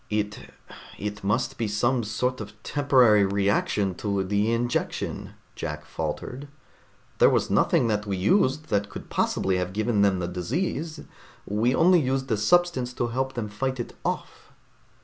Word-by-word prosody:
"It 105 0 -2 0.6
it 105 0 -5
must 125 +6 -1
be 115 - 0
some 120 +4 +1
sort 125 +4 -2
of 105 0 -8
temporary 125 -8 +4
reaction 100 0 +1
to 100 -2 0
the 105 +3 +1
injection," 120 +1 -2 0.2
Jack 75 0 -5
faltered. 135 +4 -5 0.7
"There - - +7
was - - +1
nothing - - +3
that 105 -1 -1
we 100 -1 -1
used 145 - +2
that 100 -1 0
could - - -9
possibly 95 -1 +1
have 90 0 -3
given 110 0 +1
them 100 -2 +3
the 90 -1 -2
disease, 150 - -3 0.4
we 115 +5 +1
only 180 +2 +5
used 130 -2 -1
a 110 - +2
substance 130 0 +2
to 120 -1 -1
help 130 +2 -2
them 115 -3 -2
fight 130 +5 -3
it 120 - -5
off." - - -4
110 Hz, 155 wpm, -26 LUFS, 100-130 Hz, 0.7 s, There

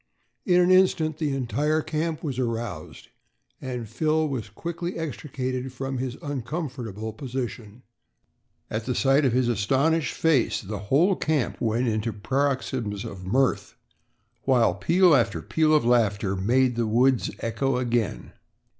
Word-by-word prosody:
In 180 -1 +5
an 180 +1 +4
instant 175 -4 +3
the 150 -4 0
entire 150 +4 0
camp 155 +1 -2
was 135 -5 -3
aroused 115 -9 -4 0.5
and 125 -3 -5
Phil 155 +6 +1
was 125 -7 -4
quickly 170 - -5
extricated 130 -4 -4
from 135 0 -4
his 130 0 -4
uncomfortable 125 - -4
position. 120 -3 -6 0.9
At 110 0 -3
the 125 - -1
sight 140 +2 +3
of 130 - +3
his 125 -1 +2
astonished 135 +8 +1
face, 155 -7 +2
the 105 0 -6
whole 175 +8 +4
camp 155 -7 -1
went 115 +2 +1
into 110 0 -1
paroxysms 120 -2 -2
of 95 -4 -8
mirth, 130 +5 +1 0.7
while 120 -8 +4
peal 175 - +4
after 110 -9 +1
peal 155 - +1
of 155 -5 +4
laughter 105 -5 +2
made 120 +6 +2
the 115 -1 +1
woods 125 +3 +2
echo 125 +3 -1
again. 120 -3 -1
130 Hz, 135 wpm, -25 LUFS, 115-150 Hz, 0.9 s, In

